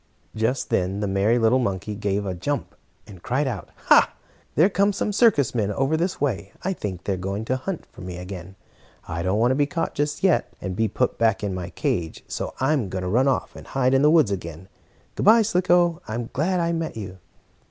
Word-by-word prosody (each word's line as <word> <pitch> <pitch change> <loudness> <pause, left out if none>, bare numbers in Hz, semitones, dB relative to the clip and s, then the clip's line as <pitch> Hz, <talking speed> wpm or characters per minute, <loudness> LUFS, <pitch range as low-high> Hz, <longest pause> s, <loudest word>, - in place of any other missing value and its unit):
Just 115 +4 -1
then 95 +2 0
the 105 - -1
merry 100 +4 +2
little 115 +2 +3
monkey 100 -3 -2
gave 100 -1 -1
a 95 - -2
jump, 140 +11 -3 0.3
and 95 -4 -13
cried 130 +5 0
out: 125 - -4 0.2
"Ha! - - +6 0.4
There 160 +7 +6
come 200 +1 +2
some 205 +1 -2
circus 195 - +4
men 105 -4 0
over 135 +8 +1
this 175 +4 -1
way. 100 -9 -2
I 190 - 0
think 95 - -5
they 100 - -1
are - - -3
going 100 +4 -3
to 130 - 0
hunt 170 +7 -4
for - - -15
me 90 -1 -6
again. 90 0 -8 0.5
I 85 0 -3
don't 95 +4 0
want 120 +3 +3
to - - +2
be 145 0 +2
caught 165 +3 -2
just 150 +3 -2
yet, 190 -3 +3
and 95 -1 -4
be 110 +2 +1
put 125 +5 -1
back 110 -3 +2
in 100 -2 -1
my 90 -2 -5
cage, 80 -3 -2
so - - -4
I'm 135 -6 +1
going 95 0 -4
to - - -2
run 125 +8 +2
off 135 - 0
and - - -11
hide 130 -1 +1
in 135 - +4
the 150 - +5
woods 155 -10 +4
again. 85 -1 -6 0.4
Good - - -2
bye, 225 +1 +8
Slicko. 175 -4 +2
I 110 - -4
am 120 -1 -4
glad 180 +6 +1
I 170 0 +1
met 165 -6 -3
you." 95 -3 -7
115 Hz, 225 wpm, -24 LUFS, 95-150 Hz, 0.5 s, bye